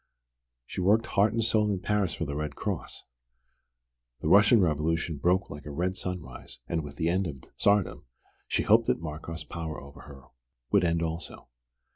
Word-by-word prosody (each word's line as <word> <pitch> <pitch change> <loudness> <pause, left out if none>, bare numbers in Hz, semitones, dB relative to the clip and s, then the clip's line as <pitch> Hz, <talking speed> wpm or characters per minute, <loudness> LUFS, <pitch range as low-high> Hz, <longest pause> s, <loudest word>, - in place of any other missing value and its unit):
She 95 - -5
worked 105 +5 +4
heart 100 0 +2
and 115 0 0
soul 110 -2 +3
in 100 -2 0
Paris 100 -3 0
for 80 - -3
the 70 -1 -4
Red 75 -1 -3
Cross. - - -4 1.2
The 80 - 0
Russian 105 +5 +7
Revolution 80 -1 0
broke 90 +6 +1
like 75 +1 -9
a - - -5
red 90 +5 -1
sunrise 90 -3 -6
and 80 -2 -1
with 70 -1 -9
the 80 - -1
end 90 +2 +1
of 70 -4 -7 0.2
Tsardom 100 -8 +2 0.4
she - - 0
hoped - - +4
that - - +2
Markoff's 80 +1 -6
power 80 0 -5
over 70 +2 -13
her 70 -3 -13 0.5
would 100 -3 +4
end 85 -1 +1
also. 80 +1 -5
85 Hz, 175 wpm, -28 LUFS, 75-100 Hz, 1.2 s, Russian